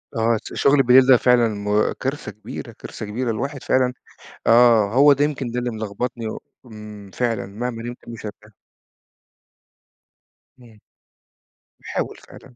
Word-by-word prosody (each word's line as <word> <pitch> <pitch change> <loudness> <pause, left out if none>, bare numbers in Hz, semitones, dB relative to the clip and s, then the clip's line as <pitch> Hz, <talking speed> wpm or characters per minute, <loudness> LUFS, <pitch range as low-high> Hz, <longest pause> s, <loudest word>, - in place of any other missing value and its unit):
آه، 115 0 +2
ت - - -8
شُغل 140 -1 +3
بالليل 130 +1 +6
ده 130 -2 +7
فعلًا 125 -1 +3
م 105 +1 0
كارثة 135 -1 -4
كبيرة، 105 +2 -9
كارثة 110 - -9
كبيرة. 115 +3 -2
الواحد 135 +5 -4
فعلًا 130 -1 +1 0.5
آه. 115 -2 +5
هو 145 +2 +7
ده 140 +1 +2
يمكن 135 -5 -3
ده 125 - -4
اللي 120 0 -2
ملغبطني 110 +2 -4
و - - -6 0.3
إمم، 105 -3 -11
فعلًا. 115 -5 -1
مهما 115 +3 -5
نِمت 120 0 -9
مش 115 -2 -8
هارتاح. 105 +1 -11 2.1
إمم. 115 -4 -18 1.0
باحاول - - -4
فعلًا. 125 -2 -16
120 Hz, 145 wpm, -21 LUFS, 110-125 Hz, 2.1 s, ده